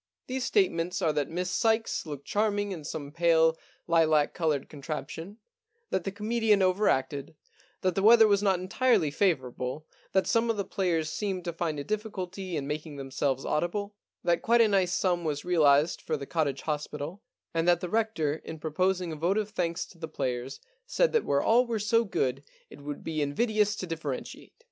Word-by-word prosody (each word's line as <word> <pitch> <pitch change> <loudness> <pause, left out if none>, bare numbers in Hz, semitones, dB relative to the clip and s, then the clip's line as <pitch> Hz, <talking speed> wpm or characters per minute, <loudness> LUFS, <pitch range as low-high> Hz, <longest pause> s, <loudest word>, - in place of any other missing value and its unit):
These 260 0 -3
statements 180 - +1
are 155 - +2
that 145 -2 -1
Miss 180 +2 -2
Sykes 225 -6 +1
looked 145 -2 -7
charming 205 -1 0
in 170 -5 -6
some 145 -1 -6
pale 160 0 +4 0.3
lilac 160 -3 +3
coloured 155 -5 0
contraption, 155 +6 -6 0.5
that 185 - -1
the 195 - -2
comedian 215 0 +2
over 185 +3 +3
acted, 135 +3 -1 0.5
that 185 -1 +1
the 195 - 0
weather 225 +1 +7
was 200 -1 +3
not 195 -3 +2
entirely 190 - +2
favourable, 140 -5 -1 0.3
that 190 - +3
some 230 0 +2
of 225 - +1
the 200 - -1
players 165 -6 -1
seemed 190 0 -3
to 170 - -3
find 160 -3 -2
a - - -3
difficulty 190 -3 -4
in 140 - -3
making 150 +1 -5
themselves 135 0 -2
audible, 200 +7 -1 0.3
that 170 -1 +2
quite 235 +1 +3
a 225 - +6
nice 190 -3 +2
sum 180 -2 +1
was 150 -3 -2
realised 155 -2 +3
for 155 - -2
the 140 - -6
Cottage 145 -3 -1
Hospital, 150 +4 -4 0.3
and 165 +1 0
that 175 -1 +5
the 180 - -4
Rector 175 -8 0
in 160 - -7
proposing 180 +3 0
a - - -4
vote 175 +6 0
of 215 -1 -1
thanks 170 -5 -1
to 170 - -18
the 160 - -5
players 130 -3 -3 0.3
said - - +2
that 460 - +2
where 140 0 +1
all 240 +2 +4
were 230 -1 -1
so 230 +2 +2
good 135 - -1 0.3
it - - -12
would 145 0 -6
be 155 -2 -2
invidious 210 +8 +1
to 190 - -5
differentiate. 160 -6 -5
170 Hz, 185 wpm, -28 LUFS, 150-205 Hz, 0.5 s, weather